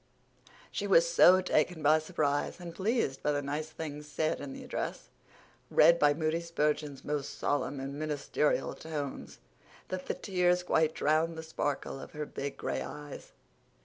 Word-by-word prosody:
She - - -2
was - - +6
so 185 - +7
taken 165 -2 +1
by 155 +2 +5
surprise 155 -2 -1
and 175 -1 -7
pleased 200 - 0
by 150 - +1
the 145 - 0
nice 150 +3 -3
things 150 -2 -7
said 155 +1 -1
in 140 -1 -6
the - - -8
address, - - -4 0.6
read 170 +2 +6
in 145 0 +4
Moody 160 0 0
Spurgeon's 150 -4 -1
most 145 -1 -3
solemn 145 -1 -1
and 135 +1 -5
ministerial 150 -1 0
tones, 150 -4 -6 0.5
that 185 0 -4
the - - -1
tears 180 -2 +1
quite 160 -3 +2
drowned 160 +2 +1
the 160 - -5
sparkle 145 -3 -3
of - - -10
her 150 0 -4
big 140 -1 -5
gray - - -2
eyes. 145 -1 -8
155 Hz, 160 wpm, -31 LUFS, 145-170 Hz, 0.6 s, so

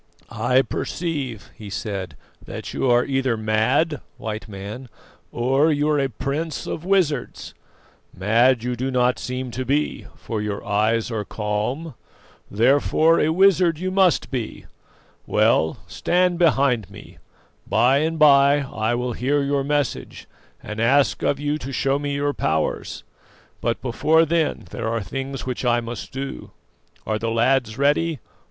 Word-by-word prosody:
"I 130 +1 +2
perceive," 140 - -4
he 105 -2 -10
said, 95 -7 -5 0.3
"that - - -7
you 130 - 0
are 120 0 +4
either 135 -4 0
mad, 115 +7 +1 0.2
White 110 +1 -5
Man, 105 +5 -8 0.4
or 135 +6 +2
you 145 0 +1
are 150 -1 +2
a 135 -1 0
prince 140 +6 -3
of 155 - -5
wizards. 175 -8 0 0.6
Mad 115 +5 +2
you 125 0 -2
do 130 +3 -2
not 125 -1 +1
seem 125 0 -4
to 130 +3 -3
be, 145 +4 -1
for 110 -3 -5
your 105 -1 -4
eyes 110 +3 +1
are 110 -2 -2
calm, 110 +10 -3 0.6
therefore 145 +8 +3
a 155 - +2
wizard 180 -1 +4
you 185 +3 -3
must 185 -3 +2
be. 120 -5 -4 0.6
Well, 80 0 +2
stand 180 0 +1
behind 135 - +2
me: - - -13 0.5
by 130 +3 +3
and 160 +2 -1
by 140 -1 +6
I 120 -4 -2
will 125 0 -2
hear 140 +5 0
your 140 0 0
message 145 -2 -2 0.4
and 105 0 -6
ask 135 +5 +3
of 140 - 0
you 145 +1 -1
to 135 0 -6
show 135 +1 0
me 145 -1 -2
your 145 0 0
powers; 80 - -2 0.6
but 115 0 -1
before 155 +6 +3
then 165 0 0
there 115 -2 -4
are 115 -2 -2
things 135 +7 -5
which 130 0 -4
I 120 -1 +3
must 120 -1 -7
do. 135 +1 -6 0.6
Are 110 0 -1
the 115 - -2
lads 115 0 +1
ready? 150 +3 +2
130 Hz, 150 wpm, -22 LUFS, 115-145 Hz, 0.6 s, by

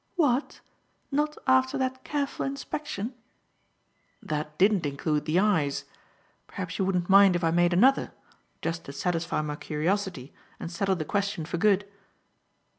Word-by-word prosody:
"What! 285 -6 +1 0.5
Not 300 +2 0
after 260 0 +3
that 260 0 -2
careful 285 -2 -2
inspection?" 275 -4 -4 1.1
"That 150 0 -4
didn't 195 -4 +3
include 150 +1 -1
the 155 +2 +1
eyes. 180 -9 +1 0.6
Perhaps 185 -1 -6
you 190 - +2
wouldn't 180 -2 0
mind 195 -1 +7
if 175 - -1
I 165 - +3
made 175 +1 +3
another, 250 +10 +4 0.5
just 165 0 -3
to 140 - -8
satisfy 170 +1 -1
my 150 -1 -4
curiosity 155 -1 -2 0.3
and 170 - -6
settle 190 +2 0
the 155 -3 -4
question 200 -3 -1
for 170 - -3
good." 200 +1 +3
185 Hz, 140 wpm, -27 LUFS, 160-220 Hz, 1.1 s, mind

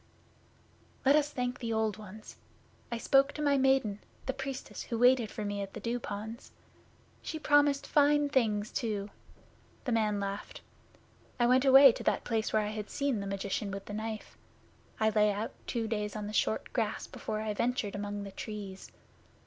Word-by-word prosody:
'Let 275 +2 +6
us 295 -1 +3
thank 250 -2 -3
the 230 -2 -3
Old 220 -2 0
Ones! 215 0 -11 0.5
I 235 - -1
spoke 275 +4 +3
to 300 - -5
my 285 -1 +4
Maiden, 265 -6 +2 0.3
the 265 - -1
Priestess 270 -1 -6
who 230 - -4
waited 245 -2 +4
for 215 - -5
me 205 0 -2
at 195 0 -6
the - - -5
Dew 240 +1 -2
ponds. 220 +1 -7 0.7
She 320 - -5
promised 290 -2 +3
fine 290 0 +4
things 220 -6 +1
too.' 210 -3 -2 0.7
The 250 - -2
man 215 -3 +1
laughed. 200 0 -5 0.8
'I 240 - +4
went 255 +2 +4
away 270 0 +9
to - - -7
that - - +1
place 225 -2 -1
where 215 - +2
I 210 - -2
had 215 -1 -5
seen 280 -6 -1
the 200 - -4
magician 195 +1 -2
with 195 0 -6
the 205 - -7
knife. 220 0 -5 0.6
I 220 0 +3
lay 210 -1 +4
out 205 +2 -3 0.2
two 230 -2 -1
days 210 -1 -2
on 210 -1 -4
the 210 - -6
short 220 - 0
grass 225 -4 -1
before 215 - -5
I 215 -1 -2
ventured 235 -2 -1
among 205 0 -4
the 200 - -7
Trees. 200 -2 -7
220 Hz, 180 wpm, -31 LUFS, 210-260 Hz, 0.8 s, away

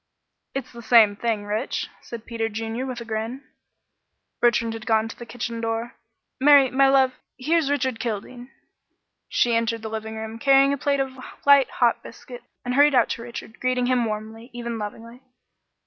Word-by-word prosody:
"It's 270 - -4
the 235 - -10
same 225 -3 +5
thing, 215 -1 -2
Rich," 215 +5 -2
said 235 -1 -9
Peter 225 -2 -3
Junior, 225 +4 -4
with 250 -2 -5
a - - -7
grin. 225 +4 -4 1.0
Bertrand 235 -1 +2
had 225 -1 -8
gone 220 0 +2
to 225 - -9
the 240 - -10
kitchen 230 -1 -5
door. 225 +1 -3 0.4
"Mary, 280 -1 +6
my 270 +1 +4
love, 265 -1 +4 0.2
here's 305 +3 +1
Richard 260 -5 -1
Kildene." 240 +2 -5 0.8
She 240 - +2
entered 230 0 -1
the 220 - -4
living 220 0 -5
room, 220 +1 -6
carrying 275 +1 +5
a - - -2
plate 280 +1 +1
of 265 -1 -3 0.3
light, 280 -2 +6
hot 240 -2 +1
biscuit, 245 +1 -11 0.2
and 250 - -1
hurried 285 +1 +5
out 245 - +4
to - - -4
Richard, 235 -2 -9
greeting 255 0 0
him 250 -1 +2
warmly 220 +2 -6
even 235 -1 -5
lovingly. 230 +4 -8
235 Hz, 175 wpm, -24 LUFS, 225-260 Hz, 1.0 s, Mary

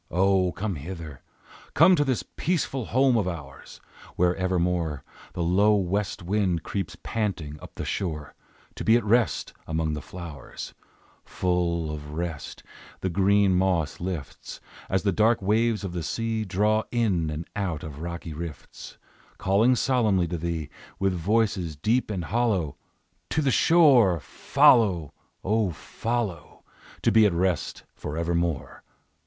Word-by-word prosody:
O 95 0 +2
come 100 -3 -3
hither; 80 -2 -8 0.5
Come 175 +4 +7
to 145 - +2
this 130 -5 -1
peaceful 140 -7 -2
home 130 +2 +3
of 100 -4 0
ours, 70 -6 -8 0.4
Where 90 0 +2
evermore 90 -5 -1 0.3
The 85 - -2
low 100 +5 +4
west 100 0 -1
wind 90 -3 0
creeps 90 -4 -4
panting 90 -9 -3
up - - -12
the - - -5
shore 75 -6 -3 0.4
To - - -4
be 115 +1 +5
at 120 - -2
rest 110 - +1
among 80 -1 -1
the 75 - -4
flowers; 80 -5 -9 0.5
Full 85 -3 -1
of 75 -1 -7
rest, 80 -3 -5 0.4
the 95 - -1
green 100 +1 +3
moss 90 -5 +1
lifts, 85 -5 -6 0.3
As 95 0 +1
the 100 - +2
dark 110 +4 +3
waves 110 +2 +1
of 95 -3 -4
the 85 - -3
sea 110 +7 -2
Draw 105 +3 +2
in 100 -10 +1
and 75 +4 -5
out 90 -7 -2
of 75 -1 -8
rocky 85 -1 -5
rifts, 80 -1 -8 0.4
Calling 105 +6 +3
solemnly 110 -9 +2
to 85 - -2
thee 80 -3 -3 0.3
With 95 -1 +1
voices 95 -2 0
deep 110 - 0
and 95 -5 -3
hollow, 100 -9 0 0.5
"To 155 - +1
the 135 - +2
shore 130 - +5
Follow! 90 -4 +3 0.3
O, 105 0 +1
follow! 105 0 -4 0.4
To - - +4
be 110 0 +6
at 95 - -1
rest 90 -1 -1
forevermore! 85 0 -2
90 Hz, 140 wpm, -26 LUFS, 85-110 Hz, 0.5 s, Come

